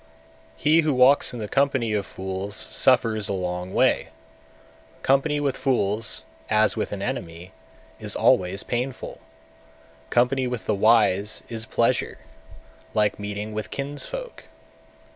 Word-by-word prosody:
207. - - -20
He 155 +2 +5
who 150 -3 0
walks 130 +3 +5
in 125 - -7
the 110 -2 -4
company 130 -3 +1
of 100 -2 -1
fools 95 +2 -5
suffers 115 -6 +2
a - - 0
long 90 -1 -3
way; - - +2 1.0
company 140 +2 +2
with 140 -3 0
fools, 110 - 0 0.3
as 110 0 +3
with - - -3
an - - -4
enemy, 85 +2 -5 0.5
is - - -1
always 95 +2 +2
painful; 125 +2 -4 0.9
company 125 +2 +2
with 125 -2 -5
the - - +1
wise 105 -1 +3
is 115 -1 -3
pleasure, - - 0 0.8
like 105 -1 +1
meeting 105 +1 -5
with 110 0 -4
kinsfolk. 145 - -6
110 Hz, 130 wpm, -24 LUFS, 100-135 Hz, 1.0 s, He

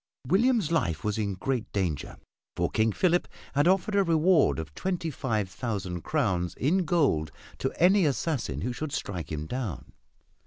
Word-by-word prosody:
William's 215 - +3
life 90 - 0
was 105 0 -1
in 100 -3 -1
great 125 +4 -2
danger, 90 -8 -2 0.4
for - - 0
King 110 0 +2
Philip 175 - +2 0.3
had 145 +3 +3
offered 190 +3 +2
a 200 - +4
reward 165 -1 +3
of 80 -2 -6
twenty 175 - -2
five 110 -8 -1
thousand 95 -4 -4
crowns 95 - 0
in 175 +7 +1
gold 140 - +2 0.3
to 135 - -1
any 185 0 +5
assassin 130 - -1
who 125 +4 -2
should 150 +3 -5
strike 90 -6 -4
him 75 0 -3
down. 120 - -5
130 Hz, 160 wpm, -28 LUFS, -, 0.4 s, any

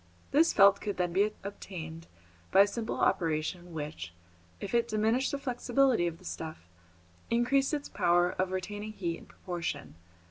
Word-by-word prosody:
This 315 +4 +5
felt 200 -1 +6
could 205 -2 -3
then 175 -1 0
be 205 +3 +3
obtained 165 -5 -7 0.4
by 195 - +7
a 200 - +6
simple 225 +2 -3
operation 165 +1 0
which, 150 - -6 0.4
if 195 - -6
it 235 0 +3
diminished 225 +4 +1
the 280 - -1
flexibility 255 -5 +2
of 165 -1 -4
the - - -18
stuff, 155 - -6 0.6
increased 245 +4 +2
its 290 -2 -2
power 175 +1 +3
of 185 0 -1
retaining 205 +3 -4
heat 170 -5 -3
in - - -16
proportion. 170 -5 -5
195 Hz, 155 wpm, -30 LUFS, 170-235 Hz, 0.6 s, by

